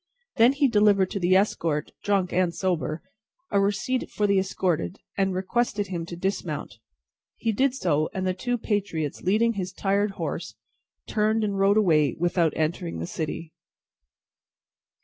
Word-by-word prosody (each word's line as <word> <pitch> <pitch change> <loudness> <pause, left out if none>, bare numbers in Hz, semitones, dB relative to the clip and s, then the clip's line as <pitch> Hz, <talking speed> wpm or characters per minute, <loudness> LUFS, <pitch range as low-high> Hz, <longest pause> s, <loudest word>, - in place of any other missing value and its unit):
Then 235 +3 +6
he 280 0 +3
delivered 205 -4 +3
to 200 - -2
the 180 +1 +3
escort, 165 -6 +1
drunk 195 -3 +1
and 180 -1 +1
sober, 165 -4 -1 0.5
a 200 - +3
receipt 210 +6 0
for 210 - -1
the 200 -1 +3
escorted, 180 - -1 0.2
and 195 -1 0
requested 205 +1 -1
him 170 -3 -4
to 170 - -6
dismount. 170 - -3 0.6
He 225 - 0
did 260 +4 +1
so, 155 - +1
and 190 0 -3
the 185 - +1
two 245 +6 -2
patriots, 195 - -2
leading 220 +5 +2
his 185 -3 -4
tired 200 +1 0
horse, - - -4 0.5
turned 215 +1 +1
and 205 -2 -1
rode 200 +2 +4
away 155 -9 +3
without 175 -1 +2
entering 155 - -2
the 80 - -3
city. 160 - -5
190 Hz, 150 wpm, -25 LUFS, 170-210 Hz, 0.6 s, Then